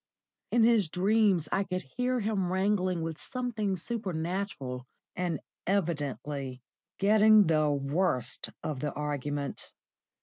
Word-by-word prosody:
In 240 - +4
his 225 -7 +4
dreams 195 -2 +3
I 195 - +2
could 185 -1 -3
hear 250 0 +1
him 200 -4 0
wrangling 185 -2 +1
with 160 -1 -5
something 230 -6 -2
supernatural, 175 - -3 0.3
and 175 -4 -1 0.3
evidently 145 - -2 0.3
getting 215 +1 +6
the 155 -2 +3
worst 140 -3 0
of 150 -4 -3
the 150 +2 -2
argument. 145 -1 -3
180 Hz, 110 wpm, -30 LUFS, 145-205 Hz, 0.3 s, getting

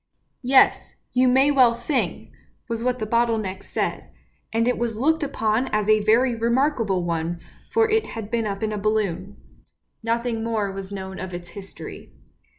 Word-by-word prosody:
" - - -48
Yes, 260 +1 +3 0.2
you 255 +1 +4
may 265 +3 +5
well 255 -4 +5
sing! 240 +3 -2 0.2
" - - -41
was 230 -1 -3
what 250 0 +1
the 220 - -3
bottle 230 +1 +2
neck 195 -3 -4
said; - - -3 0.4
and 230 +1 +1
it 250 - +1
was 235 -2 -2
looked 320 +7 +2
upon 240 -4 0
as 210 -3 -1
a 215 -1 +4
very 240 +4 +4
remarkable 230 -4 +1
one, 170 0 -2 0.3
for 450 -1 +3
it 440 0 +1
had 220 -1 -7
been 230 -2 0
up 200 +1 -4
in 215 0 -1
a 210 - -3
balloon. 200 -2 -1 0.6
Nothing 230 0 -1
more 220 -3 -1
was 195 0 -7
known 190 -1 -6
of 185 -1 -5
its 175 0 -8
history. 195 0 -10
225 Hz, 180 wpm, -23 LUFS, 200-250 Hz, 0.6 s, may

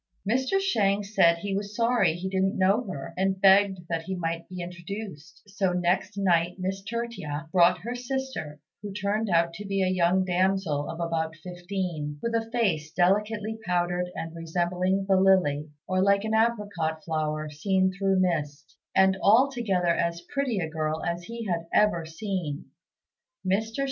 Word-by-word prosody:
Mr. 260 - +2
Shang 205 - +1
said 170 -5 +3
he 195 +3 -3
was 205 +1 -4
sorry 235 -7 +2
he 180 +2 -4
didn't 190 0 0
know 195 +5 +3
her, 140 -8 -6
and 190 0 0
begged 195 -2 +4
that 165 -1 -1
he 190 +3 -4
might 165 -1 -3
be 180 0 -7
introduced; 175 -1 -8
so 195 -2 0
next 180 +3 0
night 175 -3 +2
Miss 190 +1 -3
Tertia 200 -9 -4
brought 180 0 +5
her 235 +4 -4
sister, 250 - -4 0.2
who 205 -1 -6
turned 205 +2 -1
out 170 -1 +2
to 205 - -7
be 195 -1 0
a - - +2
young 185 +1 +2
damsel 180 -5 0
of 165 - -6
about 160 -1 -2
fifteen, 175 -5 -4
with 235 - -1
a 225 0 -1
face 185 -11 0
delicately 210 +5 +1
powdered 180 -1 0
and 165 0 -5
resembling 180 +3 -1
the 190 -1 +4
lily, 175 -6 +3 0.2
or 185 0 +1
like 200 +1 +3
an 220 0 -2
apricot 205 -9 0
flower 155 -1 -2
seen 190 +5 +1
through 195 0 +1
mist; 150 -5 -2 0.2
and 190 0 +4
altogether 220 -7 +3
as 170 0 -2
pretty 275 -6 0
a 170 -4 -1
girl 155 0 -2
as 170 0 -3
he 230 +2 -6
had 170 -4 -2
ever 170 -6 +3
seen. 165 -4 -4 0.8
Mr. 200 +4 +1
185 Hz, 165 wpm, -27 LUFS, 170-205 Hz, 0.8 s, brought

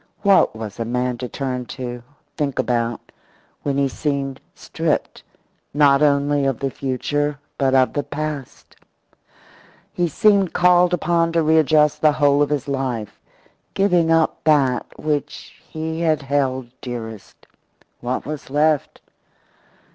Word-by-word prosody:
What 200 - +4
was 110 -1 -7
a - - 0
man 125 +1 -2
to 125 -1 -5
turn 125 -3 -4
to, 125 -2 -5 0.3
think 145 -4 -2
about, 120 -1 -1 0.5
when 140 -1 -2
he 140 -1 +2
seemed 140 -1 -3
stripped, - - -2 0.5
not 140 -1 +5
only 145 -1 +2
of 135 -3 0
the 135 +2 -3
future, 145 +3 -2 0.2
but 135 -1 +2
of 130 -1 +3
the 145 - 0
past? 150 -2 -6 1.2
He 175 -1 0
seemed 200 +2 +3
called 180 0 +4
upon 170 -1 +1
to 165 -1 +2
readjust 155 -1 +3
the 155 -1 +5
whole 145 -1 +3
of 145 - +2
his 145 -3 -2
life, 130 -6 -3 0.6
giving 180 -4 +2
up 165 -1 +2
that 140 -5 +2
which 150 -1 -4
he 160 +1 -4
had 155 -3 +1
held 130 -3 -1
dearest. 115 -4 -8 0.5
What 125 +1 -3
was 150 -2 -6
left? 150 +1 +1
145 Hz, 130 wpm, -21 LUFS, 130-155 Hz, 1.2 s, not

